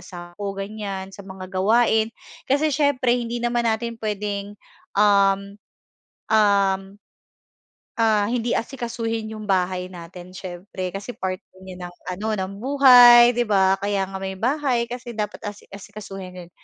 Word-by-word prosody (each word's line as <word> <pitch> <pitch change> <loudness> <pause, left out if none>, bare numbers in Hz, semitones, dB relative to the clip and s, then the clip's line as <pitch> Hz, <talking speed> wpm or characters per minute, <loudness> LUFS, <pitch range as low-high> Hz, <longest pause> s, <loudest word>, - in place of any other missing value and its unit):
asawa 175 -1 -10
ko 200 -1 -4
ganyan 195 -1 -5
sa 200 - -11
mga 190 -1 -9
gawain. 220 +3 +3 0.4
Kasi 290 +2 +2
siyempre 270 -4 +2
hindi 240 -1 -2
naman 240 0 0
natin 230 +1 -2
puwedeng, 205 -1 -4 0.4
um, 200 0 +3 0.7
um, 200 -2 +2 1.0
ah 215 -3 +2
hindi 240 0 -1
asikasuhin 230 -3 -3
'yong 215 -1 -8
bahay 185 -1 0
natin 175 0 -11
siyempre 185 0 -7
kasi 200 +5 -7
part 185 0 -3 0.2
niya 180 -1 -8
ng 175 - -15 0.2
ano 200 +4 -5 0.2
ng 190 - -7
buhay 245 -3 +8
'di 240 -2 -1
ba? 190 -2 +4
Kaya 200 -1 0
nga 190 0 -7
may 190 0 -5
bahay 255 +1 0
kasi 240 -1 -8
dapat 210 -1 -4
asi 205 - -10
asikasuhin 195 -3 -9
'yon. 170 - -19
205 Hz, 140 wpm, -23 LUFS, 190-235 Hz, 1.0 s, buhay